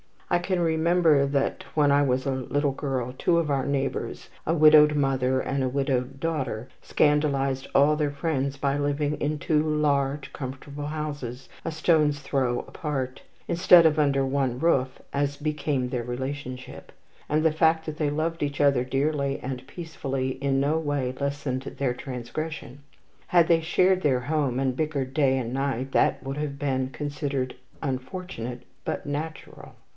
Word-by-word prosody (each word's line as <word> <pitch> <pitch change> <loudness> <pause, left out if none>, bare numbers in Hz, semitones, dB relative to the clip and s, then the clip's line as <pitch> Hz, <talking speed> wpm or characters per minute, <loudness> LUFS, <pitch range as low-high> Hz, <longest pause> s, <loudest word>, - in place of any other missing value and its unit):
I 175 - +4
can 180 0 -1
remember 160 -3 +3
that, 140 0 -1
when 145 -2 +4
I 140 0 +5
was 130 -1 0
a 135 - +1
little 140 +2 0
girl, 130 -3 -3
two 170 - +2
of 160 -3 +1
our 135 -2 +1
neighbours, 140 -1 -2 0.2
a 160 - +3
widowed 150 -1 +7
mother 130 -2 +1
and 135 0 -2
a 130 - +1
widowed 135 -1 -1
daughter, 135 -8 -2
scandalized 140 -3 +1
all 145 +2 +5
their 150 -1 +1
friends 140 -2 -1
by 140 0 0
living 145 +1 0
in 150 +1 -1
two 150 +1 +1
large 145 -2 0
comfortable 140 +2 -6
houses, 145 -5 -5 0.2
a - - -1
stone's 155 -2 +2
throw 130 -3 0
apart, 135 -5 -4 0.3
instead 170 0 +6
of 155 -1 +4
under 140 -2 +2
one 135 -2 0
roof 130 -4 +1
as 145 0 0
became 150 -4 -1
their 125 -2 -2
relationship; 130 +1 -6 0.4
and 155 +1 +2
the 160 - +4
fact 160 +1 +2
that 155 -1 -5
they 150 -2 +1
loved 160 +3 -2
each 145 -1 -1
other 140 -4 +4
dearly 140 +1 0
and 130 0 -5
peacefully 135 -6 -4
in 135 -1 +1
no 150 +3 +1
way 145 -5 -1
lessened 140 -2 -2
their 135 -2 -2
transgression. 130 +3 -6 0.5
Had 170 -2 +4
they 165 -1 +5
shared 185 +3 +3
their 130 -6 +2
home, 140 -2 0
and 130 -2 0
bickered 140 -4 -2
day 135 -2 +3
and 120 -2 -3
night, 135 -1 -2
that - - +2
would 135 +1 -4
have 150 -2 -3
been 130 -2 -1
considered 140 -2 -3 0.3
unfortunate 130 -2 -5 0.2
but - - -3
"natural." 155 +3 -6
140 Hz, 160 wpm, -26 LUFS, 130-150 Hz, 0.5 s, widowed